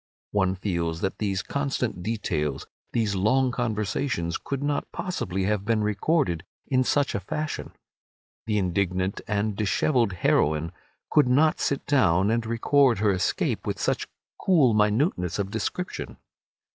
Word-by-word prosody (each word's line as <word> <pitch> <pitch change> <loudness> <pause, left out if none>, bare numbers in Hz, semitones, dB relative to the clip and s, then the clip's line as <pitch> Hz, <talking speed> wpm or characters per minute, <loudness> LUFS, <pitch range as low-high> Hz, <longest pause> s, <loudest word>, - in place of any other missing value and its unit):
One 95 -2 +1
feels 85 -4 -2
that 95 - -2
these 100 -3 -1
constant 135 -8 -2
details, 80 -10 -2 0.3
these 110 -4 0
long 125 +7 +2
conversations, 110 -5 -1
could 140 0 -4
not 145 0 -1
possibly 95 - -3
have 100 0 0
been 110 0 +1
recorded 105 - +1 0.2
in 130 -1 +2
such 145 +2 +1
a - - -1
fashion. 150 +11 -4 0.7
The 105 -1 +1
indignant 95 0 0
and 105 0 0
dishevelled 110 +2 +1
heroine 80 -2 +1 0.4
could 150 -4 +5
not 150 +5 +3
sit 140 - -1
down 95 - +3
and 115 0 +1
record 120 +2 +3
her 105 0 +2
escape 95 -2 -1
with - - -1
such - - 0 0.4
cool 150 - +4
minuteness 105 - +1
of 100 -1 -2
description. 115 - -4
105 Hz, 135 wpm, -26 LUFS, 95-130 Hz, 0.7 s, could